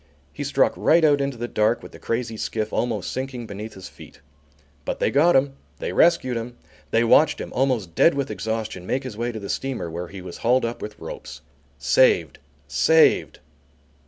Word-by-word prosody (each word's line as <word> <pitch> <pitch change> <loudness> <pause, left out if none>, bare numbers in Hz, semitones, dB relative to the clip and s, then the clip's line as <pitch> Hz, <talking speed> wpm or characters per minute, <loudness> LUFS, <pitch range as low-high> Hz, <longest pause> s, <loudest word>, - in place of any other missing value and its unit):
He - - -5
struck - - +2
right 165 +1 +3
out 145 -2 +4
into 140 -2 -2
the 120 +1 -4
dark 110 +1 +1
with - - -10
the - - -13
crazy 115 -1 -3
skiff 110 0 -3
almost 115 -5 -1
sinking 130 -2 -5
beneath 105 +1 -8
his 95 -1 -9
feet. - - -15 0.6
But - - -4
they - - +1
got 160 +5 +4
him. 135 +1 +3 0.2
They - - -4
rescued 130 -7 +3
him. 120 +1 -6 0.3
They 115 - +2
watched 145 +7 +4
him, - - -7
almost 125 -10 0
dead 165 - +4
with 140 -5 -2
exhaustion, 105 -2 -4
make 135 +2 -1
his 130 -5 -7
way 120 +2 -2
to 110 - -6
the 100 - -7
steamer, 130 -11 -3
where 85 +2 -5
he 95 +2 -9
was 90 -1 -9
hauled 125 +1 +2
up 115 +1 -5
with 105 - -7
ropes. - - -9 0.4
Saved! - - +3 0.3
Saved!! 475 -4 +3
120 Hz, 190 wpm, -23 LUFS, 110-135 Hz, 0.6 s, out